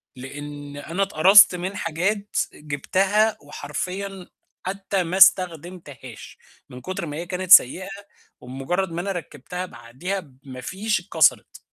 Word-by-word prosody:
لأن 145 +2 -9
أنا 170 +7 -2
اتقرصت 195 +1 +6
من 185 +3 -5
حاجات 200 +6 -2 0.2
جِبتها 190 +9 0
وحرفيًا 180 +7 -6 0.4
حتى 195 0 -2
ما 175 +2 -3
استخدمتهاش 170 - +1 0.3
من 125 - -11
كُتر 185 +2 -5
ما 150 -2 -6
هي 170 - -5
كانت 180 +1 -5
سيئة 185 +4 +6 0.5
وبمُجرد 135 +9 -3
ما 170 +1 -3
أنا 195 +2 -3
ركِّبتها 180 +1 -6
بعديها 135 +8 -6
بما 135 -5 -12
فيش، 205 +7 -2
اتكسرِت. 175 +3 +1
175 Hz, 125 wpm, -23 LUFS, 145-195 Hz, 0.5 s, اتقرصت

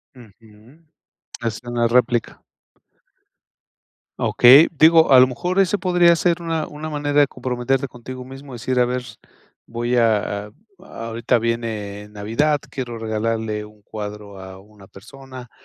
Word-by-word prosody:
Ujú. 110 +3 -19 0.6
Es 115 -2 -3
una 120 -1 -1
réplica. 120 -1 0 1.8
Okey. 135 +6 +6
Digo, 160 0 +5
a 130 - +9
lo 130 - +6
mejor 180 +9 -2
ese 195 +1 +2
podría 175 -3 +3
ser 170 0 0
una 165 -2 -3
una 150 +1 -7
manera 145 -1 +1
de 145 - +3
comprometerte 130 +1 -2
contigo 125 +1 -10
mismo, 135 +1 -11
decir 125 +1 -2
a 125 - +4
ver, 125 +1 -3 0.6
voy 120 +1 -3
a 105 -3 0
a - - -17 0.6
ahorita 115 +1 0
viene 110 -3 -4
Navidad, 115 +9 -1
quiero 120 -4 -5
regalarle 110 -1 -3
un 105 0 -18
cuadro 105 -1 -8
a 95 0 -11
una 100 0 -18
persona, 130 +5 -13
120 Hz, 135 wpm, -20 LUFS, 110-140 Hz, 1.8 s, a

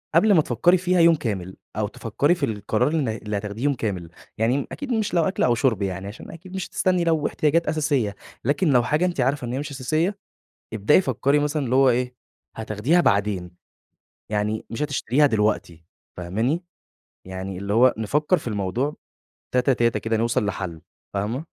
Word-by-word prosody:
قبل 215 -1 +5
ما 160 - +6
تفكري 175 +9 +3
فيها 180 0 +1
يوم 165 0 +6
كامل 95 - -4 0.2
أو 105 -1 0
تفكري 115 - 0
في 170 -5 -1
القرار 105 0 0
الن 150 -3 0
اللي 105 -1 -3
هتاخديه 105 +4 -5
يوم 145 -1 +3
كامل، 95 -9 -4 0.3
يعني 125 +5 +1
أكيد 280 -3 -5
مش 220 -5 -1
لو 170 - +3
أكْل 190 +3 0
أو 120 -1 +3
شُرب 115 -4 +1
يعني 95 0 -3
عشان 105 +3 -9
أكيد 180 +3 -11
مش 190 - -3
هتستني 180 -2 +1
لو 160 -3 +1
احتياجات 160 +2 +1
أساسية، 145 -10 0 0.3
لكن 145 +7 +1
لو 125 -3 +4
حاجة 150 +7 +1
أنتِ 175 -6 -1
عارفة 130 0 0
إن 120 - -4
هي 130 - -1
مش 145 +1 -5
أساسية 155 +9 -1 0.6
ابدئي 110 - +4
فكري 140 - +1
مثلًا 150 0 -1
اللي 125 +1 0
هو 135 0 +6
إيه 125 +1 0 0.4
هتاخديها 110 - +1
بعدين، 100 - +1 0.8
يعني 105 +1 -1
مش 115 +6 -3
هتشتريها 145 0 +2
دلوقتي 105 - 0 0.3
فاهماني، 110 - -1 0.6
يعني 95 0 -6
اللي 100 +2 -3
هو 125 +3 +5
نفكر 150 - +1
في 155 - -8
الموضوع 110 +7 -1 0.6
تاتا 125 +1 +3
تاتا 120 -1 +1
كده 110 0 -1
نوصل 115 -1 +1
لحل. 95 -5 -4 0.3
فاهمة؟ 110 +9 -2
125 Hz, 180 wpm, -23 LUFS, 105-150 Hz, 0.8 s, ما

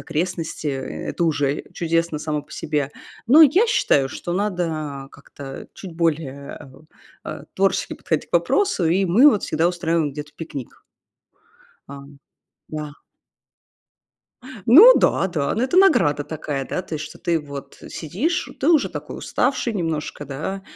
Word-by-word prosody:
окрестности, 165 -1 -3
и 145 - +1 0.4
это 170 - -1
уже 145 -3 0
чудесно 165 -1 0
само 150 -1 -3
по - - -17
себе. 150 -3 -2 0.4
Но 310 +5 +8
я 350 - +5
считаю, 140 - +2
что 175 - -5
надо 165 -8 -3
как-то 135 -1 -10
чуть 185 -4 -9
более, 150 -4 -2
э, - - -10
у, 155 +4 -18 0.4
э, - - -7
творчески - - 0
подходить - - -3
к - - -47
вопросу, 400 - +2
и 180 +4 +2
мы 220 +12 +6
вот 210 - -1
всегда 160 +2 +1
устраиваем 170 -3 0
где-то 150 +1 -8
пикник. 145 -6 -8 1.1
Ам, 140 0 -11 0.5
да. 150 -1 -5 1.8
Ну 390 - +9
да-да, 160 -7 +1
ну 225 - -1
это 265 +7 0
награда 245 - +4
такая, 145 -2 -4
да, - - -3
то 165 - -7
есть, 155 0 -4
что - - -11
ты 170 -1 0
вот 140 -2 -9
сидишь, 225 - -2
ты 275 - +1
уже 320 -4 +4
такой - - -7
уставший 250 -2 -1
немножко, 160 -5 -3
да, 150 +8 -5
165 Hz, 145 wpm, -22 LUFS, 145-195 Hz, 1.8 s, Ну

